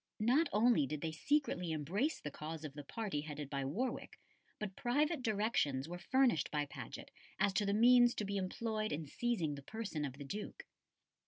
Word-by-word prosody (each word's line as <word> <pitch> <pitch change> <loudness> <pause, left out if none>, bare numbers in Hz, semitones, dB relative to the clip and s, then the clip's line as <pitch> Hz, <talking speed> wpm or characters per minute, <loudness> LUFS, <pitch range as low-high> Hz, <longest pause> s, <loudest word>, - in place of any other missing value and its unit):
Not 265 +9 +3
only 215 - +4
did 150 0 -4
they 160 - -1
secretly 180 - 0
embrace 185 - 0
the 150 - -5
cause 155 +2 -6
of 145 - -6
the 145 0 -7
party 195 -1 -3
headed 150 -2 -6
by 140 -1 -1
Warwick, 210 - -3 0.4
but 200 -3 -5
private 290 +4 +1
directions 205 - +1
were 175 +1 -6
furnished 255 0 +3
by 150 -1 0
Paget 140 - -8 0.3
as 200 - +2
to 205 0 +1
the 200 - +2
means 240 +2 +6
to 210 - -2
be 200 +1 -3
employed 215 +3 -2
in 155 +1 -2
seizing 175 -2 -1
the 140 - -7
person 195 -2 -4
of 140 -3 -3
the 140 +2 -8
Duke. 205 +9 -6
195 Hz, 185 wpm, -36 LUFS, 150-235 Hz, 0.4 s, means